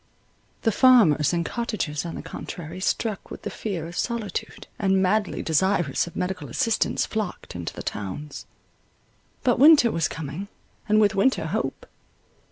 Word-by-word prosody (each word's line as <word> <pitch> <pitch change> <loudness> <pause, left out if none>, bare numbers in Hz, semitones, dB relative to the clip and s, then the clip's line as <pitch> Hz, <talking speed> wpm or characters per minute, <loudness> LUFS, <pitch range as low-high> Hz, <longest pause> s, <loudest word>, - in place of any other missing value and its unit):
The 225 - +3
farmers 210 - +5
and 170 -1 0
cottagers, 210 -10 -3
on 165 - -6
the - - -6
contrary, 170 +1 -7
struck 210 +2 -2
with - - -9
the - - -4
fear 185 -7 -4
of 170 +1 -8
solitude, 225 -5 -3
and 195 -2 +2
madly 200 +2 +1
desirous 175 -2 +1
of 170 - -10
medical 180 -6 -3
assistance, 225 - +1
flocked 215 - -4
into 85 -1 -5
the - - -7
towns. 105 +9 -6 1.0
But 245 -2 +2
winter 290 -5 +7
was 165 -1 +1
coming, 165 +5 -6 0.4
and 215 +1 +5
with 205 -2 +4
winter, 230 +7 +2
hope. - - -3
190 Hz, 150 wpm, -25 LUFS, 160-220 Hz, 1.0 s, winter